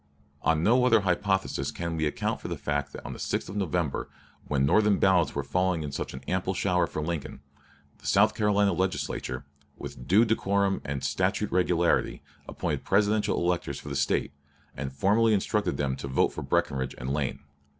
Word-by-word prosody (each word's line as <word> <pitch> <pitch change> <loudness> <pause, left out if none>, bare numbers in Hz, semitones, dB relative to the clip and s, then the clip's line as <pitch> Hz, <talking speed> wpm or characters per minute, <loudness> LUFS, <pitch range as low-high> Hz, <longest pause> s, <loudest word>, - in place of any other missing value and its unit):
On 80 0 +2
no 125 +6 +4
other 115 -4 +5
hypothesis 95 +1 0
can 85 -1 -4
we 80 -1 0
account - - -2
for - - -6
the - - -4
fact 70 -2 -2
that - - -10
on - - -5
the - - -10
6th - - -2
of 95 - -7
November, 90 -6 -1 0.4
when 70 -2 +1
Northern 105 +6 +4
ballots 90 -6 +3
were 70 - -1
falling 90 +3 0
in 75 - -5
such 70 - -4
an 65 - -9
ample 95 +1 -1
shower 90 -2 +1
for 75 - -4
Lincoln, 80 -3 -4 0.6
the - - -9
South 110 +2 +4
Carolina 105 -2 +2
Legislature, 85 -8 -2 0.3
with 60 - -8
due 105 +6 +5
decorum 100 -3 +1
and 70 -1 -4
statute - - 0
regularity, 85 -1 +1 0.3
appointed - - -3
Presidential 105 +1 +2
electors 90 0 -1
for - - -9
the 70 - -4
State, 70 0 0 0.4
and 65 0 -4
formally 105 +10 +3
instructed 105 -6 0
them 65 -2 0
to 70 - -6
vote 65 - +2
for - - -5
Breckinridge 65 -1 -1
and 65 +2 -3
Lane. 70 -1 -2
90 Hz, 180 wpm, -27 LUFS, 70-100 Hz, 0.6 s, other